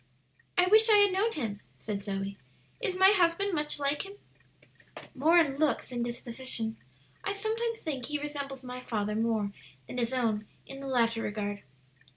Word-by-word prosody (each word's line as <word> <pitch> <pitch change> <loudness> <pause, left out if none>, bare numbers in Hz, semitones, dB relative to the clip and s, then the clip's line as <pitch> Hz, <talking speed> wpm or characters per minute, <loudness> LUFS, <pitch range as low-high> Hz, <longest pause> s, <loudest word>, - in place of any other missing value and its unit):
"I 360 - +6
wish 435 +4 +6
I 430 - +8
had 405 -1 +6
known 430 +4 +1
him," 215 -8 -3 0.2
said 205 -2 -4
Zoe. 195 0 -4 0.4
"Is 400 -6 0
my 380 +1 +7
husband 375 +1 +3
much 300 -2 0
like 285 0 0
him?" 395 0 -9 1.0
"More 315 +6 +4
in 285 -5 +4
looks 310 0 +1
than 245 -2 -3
disposition. 235 -1 -3 0.5
I 400 - -1
sometimes 450 +3 -1
think 270 -7 -3
he 295 - -1
resembles 280 -2 -5
my 250 0 -6
father 210 -4 -2
more 220 -2 0 0.3
than 250 - -5
his 235 0 0
own 220 -5 0 0.2
in 270 - -9
the 275 - -6
latter 230 -3 +2
regard. 205 -1 -3
270 Hz, 170 wpm, -30 LUFS, 225-360 Hz, 1.0 s, I